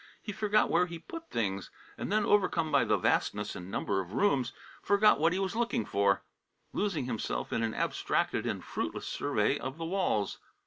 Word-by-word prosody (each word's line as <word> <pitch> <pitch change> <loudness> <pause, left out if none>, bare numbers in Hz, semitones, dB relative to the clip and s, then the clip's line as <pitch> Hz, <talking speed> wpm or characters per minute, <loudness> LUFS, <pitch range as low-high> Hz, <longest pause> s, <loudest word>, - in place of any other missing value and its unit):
He 210 - -6
forgot 210 +1 +2
where 180 +1 +3
he 170 -1 -6
put 330 - -9
things, 100 -4 -2 0.3
and - - -5
then, 210 0 +3
overcome 180 -6 +2
by 140 -3 +4
the - - +3
vastness 105 0 0
and 90 +1 -7
number 95 0 -1
of 95 +1 -5
rooms, 135 - +2 0.3
forgot 205 -4 +4
what 165 +2 +4
he 180 - 0
was 195 +1 -1
looking 230 - 0
for, 100 -1 +2 0.5
losing 180 -10 0
himself 65 - -3
in 115 - +1
an 115 -1 -1
abstracted - - 0
and - - -2
fruitless - - -4
survey - - 0
of 130 +3 -5
the 165 - -4
walls. 170 - 0
160 Hz, 185 wpm, -31 LUFS, -, 0.5 s, by